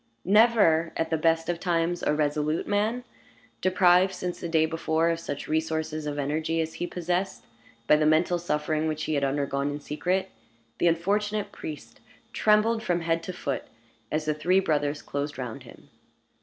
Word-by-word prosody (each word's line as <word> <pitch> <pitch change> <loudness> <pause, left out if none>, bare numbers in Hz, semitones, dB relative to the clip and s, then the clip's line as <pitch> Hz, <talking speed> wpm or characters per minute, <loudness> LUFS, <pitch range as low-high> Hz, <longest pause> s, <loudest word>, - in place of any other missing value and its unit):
Never, 200 -6 +4
at 165 0 -1
the - - +3
best 165 +1 +1
of 175 -1 -1
times, 175 -1 0
a - - +1
resolute 150 +1 0
man; 215 +4 0 0.6
deprived, 185 0 +4
since 180 -1 -4
the 170 - -5
day 160 -1 +3
before, 160 0 0
of 165 - -2
such 145 -4 -5
resources 160 -1 -2
of 145 0 -3
energy 155 +3 -1
as 160 0 -2
he 175 - -4
possessed, 180 +2 -2 0.4
by 150 - +5
the 155 - +1
mental 165 +3 +3
suffering 155 -1 -1
which 155 0 -2
he 155 - -2
had 140 -1 0
undergone 140 0 0
in 145 0 -4
secret, 180 +6 -2 0.5
the - - +3
unfortunate 205 +5 0
priest 150 -2 -9 0.3
trembled 220 +1 +3
from 175 -4 0
head 165 0 0
to 185 - -5
foot 145 -6 -4 0.5
as 155 0 -1
the 155 - +1
three 180 +5 +2
brothers 145 -4 0
closed 145 +1 -4
round 125 -4 -5
him. - - -16
165 Hz, 170 wpm, -27 LUFS, 155-180 Hz, 0.6 s, by